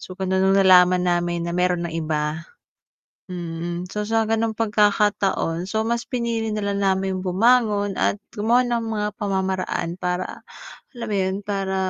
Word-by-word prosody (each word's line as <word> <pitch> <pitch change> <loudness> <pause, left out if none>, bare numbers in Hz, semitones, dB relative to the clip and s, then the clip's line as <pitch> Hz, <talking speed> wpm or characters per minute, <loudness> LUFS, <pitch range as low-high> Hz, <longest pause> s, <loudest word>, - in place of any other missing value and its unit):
So, 185 - -10
kaya 190 -1 0
nung 190 +1 +3
nalaman 180 -2 +6
namin 175 -1 0
na 170 - -3
meron 180 0 +1
ng 170 - -4
iba 155 -1 -2 0.9
mm, 175 0 -5
so, 210 - -2
sa 225 0 +2
gano'ng 225 0 -1
pagkakataon, 205 -5 +1
so, 220 +2 -1
mas 235 +1 0
pinili 235 -3 -2
na 210 -1 -2
lang 200 0 -1
namin 190 -1 +1
yung - - -5
bumangon 205 +1 +2
at 195 - 0 0.2
gumawa 235 +4 +2
ng 240 -1 -1
mga 210 -1 -1
pamamaraan 190 -3 -1
para 180 0 -3 0.5
alam 240 -2 -6
mo 210 - -1
yun, 190 0 0
para 195 -1 -2
195 Hz, 160 wpm, -22 LUFS, 180-215 Hz, 0.9 s, nalaman